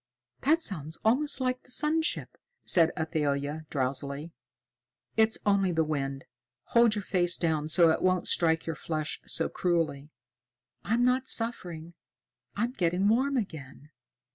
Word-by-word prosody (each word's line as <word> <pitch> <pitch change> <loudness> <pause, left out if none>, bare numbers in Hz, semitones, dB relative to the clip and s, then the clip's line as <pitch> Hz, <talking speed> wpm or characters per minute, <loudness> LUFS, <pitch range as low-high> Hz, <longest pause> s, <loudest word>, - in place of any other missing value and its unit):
"That 320 +4 +2
sounds 160 - -3
almost 280 +6 +2
like 255 -1 -1
the - - -23
sun 300 +5 +2
ship," 320 - -3 0.3
said 165 -3 +4
Athalia 150 -1 -2
drowsily. 140 +3 -2 0.8
"It's 220 0 +3
only 200 -2 +2
the 165 -1 +1
wind. 135 -3 -3 0.5
Hold 235 -2 +5
your 205 - -3
face 180 -2 +1
down 160 -3 0
so 165 0 +5
it - - -1
won't 185 -1 +1
strike 160 -1 +2
your 165 - -3
flesh 155 -1 -4
so - - 0
cruelly." 165 -5 -1 0.7
"I'm 235 +3 +1
not 255 +1 +1
suffering. 175 -8 0 0.6
I'm 235 +4 -1
getting 185 -2 +1
warm 265 +5 +2
again." 150 - -6
175 Hz, 140 wpm, -28 LUFS, 155-230 Hz, 0.8 s, Hold